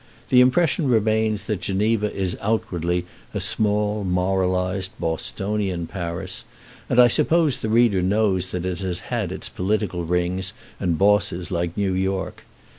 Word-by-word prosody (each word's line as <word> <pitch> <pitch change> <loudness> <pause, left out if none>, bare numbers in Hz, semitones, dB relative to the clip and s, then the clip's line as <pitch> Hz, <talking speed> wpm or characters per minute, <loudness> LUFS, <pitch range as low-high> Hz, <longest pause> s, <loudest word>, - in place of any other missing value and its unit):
The 125 - +6
impression 145 +3 +3
remains 110 -2 +2
that 105 -4 -3
Geneva 105 +2 +1
is 95 -2 -2
outwardly 90 -5 -1 0.3
a - - 0
small 105 0 +1
moralized 95 0 0
Bostonian 95 +2 -2
Paris; 85 -2 -5 0.5
and 125 - +3
I 125 - +9
suppose 160 +3 +3
the 110 - -3
reader 110 -4 +4
knows 95 -1 +1
that 90 -1 -4
it 90 -2 -2
has 90 -2 -2
had - - -1
its - - -4
political 95 -2 -1
rings 90 +3 -1 0.3
and 85 -4 0
bosses 95 -2 +2
like 85 -1 -2
New 100 -2 +1
York. 95 0 -2
95 Hz, 140 wpm, -23 LUFS, 90-110 Hz, 0.5 s, I